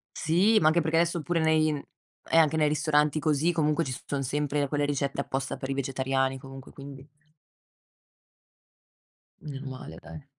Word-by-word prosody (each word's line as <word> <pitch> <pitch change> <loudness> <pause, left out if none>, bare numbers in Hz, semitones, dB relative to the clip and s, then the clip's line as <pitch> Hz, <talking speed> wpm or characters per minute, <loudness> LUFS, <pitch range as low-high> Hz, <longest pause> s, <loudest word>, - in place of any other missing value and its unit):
Sì, 185 +8 +3
ma 155 - +3
anche 165 +2 +4
perché 160 +1 0
adesso 170 0 +1
pure 170 +2 -1
nei 160 -1 +3 0.6
eh, 165 - +4
anche 160 -1 +4
nei 155 -1 +3
ristoranti, 150 0 +2
così, 155 +2 +1
comunque 160 -1 +1
ci 130 - -3
son 140 -1 -2
sempre 145 +1 -1
quelle 145 +1 0
ricette 140 -1 -1
apposta 135 0 -3
per 135 - -6
i - - 0
vegetariani, 135 0 -1
comunque, 135 0 -11
quindi 140 0 -11 2.3
Meno 140 -2 -7
male, 130 -11 -8
dai. 150 -3 -11
145 Hz, 155 wpm, -27 LUFS, 135-160 Hz, 2.3 s, anche